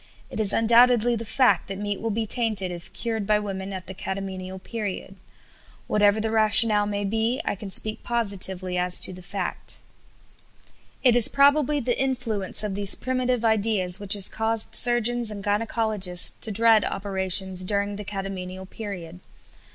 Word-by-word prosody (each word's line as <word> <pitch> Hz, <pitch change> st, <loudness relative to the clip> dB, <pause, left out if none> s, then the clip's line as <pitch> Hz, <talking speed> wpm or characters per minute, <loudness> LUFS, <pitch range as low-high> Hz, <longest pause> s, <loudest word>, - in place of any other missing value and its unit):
It -, -, -7 dB
is 210 Hz, -2 st, +2 dB
undoubtedly 235 Hz, +1 st, +3 dB
the 230 Hz, 0 st, -6 dB
fact 220 Hz, -4 st, +1 dB
that 195 Hz, -, -7 dB
meat 205 Hz, 0 st, -5 dB
will 225 Hz, -, -3 dB
be 220 Hz, +1 st, -3 dB
tainted 215 Hz, -5 st, +1 dB
if 175 Hz, -1 st, -10 dB
cured 225 Hz, -4 st, -4 dB
by 210 Hz, 0 st, +2 dB
women 195 Hz, -2 st, -6 dB
at 185 Hz, -1 st, -8 dB
the 190 Hz, -, -8 dB
catamenial 190 Hz, -1 st, -7 dB
period. 195 Hz, -1 st, -7 dB, 0.7 s
Whatever 205 Hz, 0 st, +1 dB
the 220 Hz, 0 st, -3 dB
rationale 215 Hz, -1 st, +6 dB
may 205 Hz, 0 st, -4 dB
be, 225 Hz, +5 st, -2 dB
I -, -, -2 dB
can 200 Hz, 0 st, -9 dB
speak 215 Hz, +3 st, +4 dB
positively 190 Hz, -5 st, -2 dB
as 180 Hz, 0 st, +2 dB
to -, -, 0 dB
the 180 Hz, -, -12 dB
fact." 185 Hz, 0 st, -5 dB, 1.3 s
It 250 Hz, -3 st, +4 dB
is 240 Hz, -3 st, +5 dB
probably 285 Hz, +1 st, +2 dB
the 250 Hz, -1 st, -1 dB
influence 240 Hz, -8 st, -2 dB
of 210 Hz, -2 st, -4 dB
these 200 Hz, 0 st, +3 dB
primitive 255 Hz, -2 st, -3 dB
ideas 210 Hz, -4 st, 0 dB
which 200 Hz, -1 st, +1 dB
has 200 Hz, -2 st, +2 dB
caused 220 Hz, 0 st, -2 dB
surgeons 240 Hz, -1 st, +3 dB
and 205 Hz, -2 st, -4 dB
gynæcologists 210 Hz, -3 st, +1 dB
to 220 Hz, -, +1 dB
dread 225 Hz, +1 st, +3 dB
operations 190 Hz, -1 st, +1 dB
during 200 Hz, +1 st, -3 dB
the 210 Hz, -, -8 dB
catamenial 190 Hz, -2 st, -7 dB
period. 180 Hz, -5 st, -9 dB
205 Hz, 160 wpm, -23 LUFS, 190-225 Hz, 1.3 s, rationale